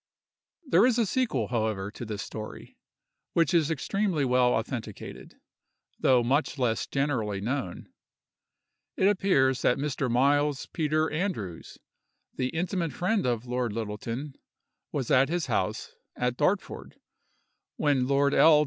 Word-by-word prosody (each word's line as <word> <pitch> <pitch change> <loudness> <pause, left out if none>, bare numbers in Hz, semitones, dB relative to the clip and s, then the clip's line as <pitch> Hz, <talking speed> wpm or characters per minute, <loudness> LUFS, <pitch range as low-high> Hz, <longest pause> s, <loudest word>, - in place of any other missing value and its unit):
There 265 - +4
is 250 -2 +2
a 235 - +3
sequel, 195 - 0
however, 110 -4 -1
to 120 - -7
this 105 -3 -4
story, 110 +1 -8 0.6
which 165 -3 +2
is 165 -3 +3
extremely 165 0 0
well 125 -1 +3
authenticated, 110 -2 -5 0.6
though 125 -2 +4
much 140 +5 +1
less 120 -4 0
generally 125 -8 -1
known. 115 -3 -3 1.1
It 190 - +4
appears 160 -11 +3
that 125 - +3
Mr. 140 -2 -2
Miles 140 +3 +2
Peter 155 0 0
Andrews, 150 - -4 0.6
the 125 - -1
intimate 170 0 -2
friend 190 - 0
of 120 -1 -1
Lord 125 -3 -2
Littleton, 115 +6 -4 0.6
was 135 -5 -2
at 130 +2 +5
his 175 0 -1
house, 105 -7 -2 0.2
at 125 0 -1
Dartford, 180 +9 -1 0.8
when 140 -4 +1
Lord 140 +1 +2
L. 155 -2 +7
135 Hz, 130 wpm, -28 LUFS, 120-160 Hz, 1.1 s, L